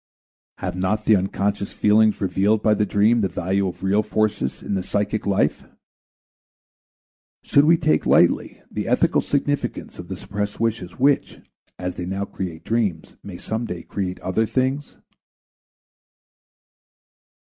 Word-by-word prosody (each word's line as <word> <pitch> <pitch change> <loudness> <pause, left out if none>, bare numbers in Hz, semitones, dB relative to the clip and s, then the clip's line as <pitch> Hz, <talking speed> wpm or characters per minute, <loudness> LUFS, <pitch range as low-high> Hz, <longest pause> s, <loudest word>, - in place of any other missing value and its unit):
Have - - -4
not 105 +4 -1
the 110 - +6
unconscious 100 +1 -1
feelings 105 0 +3
revealed 100 +3 +1
by 110 - +4
the 105 0 +1
dream 110 +3 +3
the 100 - +2
value 95 +2 -1
of 90 - -7
real 100 +2 +3
forces 105 -9 -1
in - - -3
the 95 - 0
psychic 105 +2 -2
life? 100 -1 +1 1.8
Should 140 +1 +4
we 165 +2 +5
take 80 - +1
lightly - - +3
the - - -3
ethical - - +2
significance 145 -6 -2
of 90 - -8
the 95 - -6
suppressed 100 +2 -4
wishes 110 -6 -1
which, 140 +2 +2 0.4
as 90 0 -4
they 90 - -4
now 95 +1 -2
create 90 -5 -6
dreams, 105 -9 -1
may 95 -3 -8
some 110 +5 -3
day 85 -2 -6
create 95 -2 -4
other 110 +4 0
things? 130 +4 -1
100 Hz, 140 wpm, -22 LUFS, 95-110 Hz, 1.8 s, the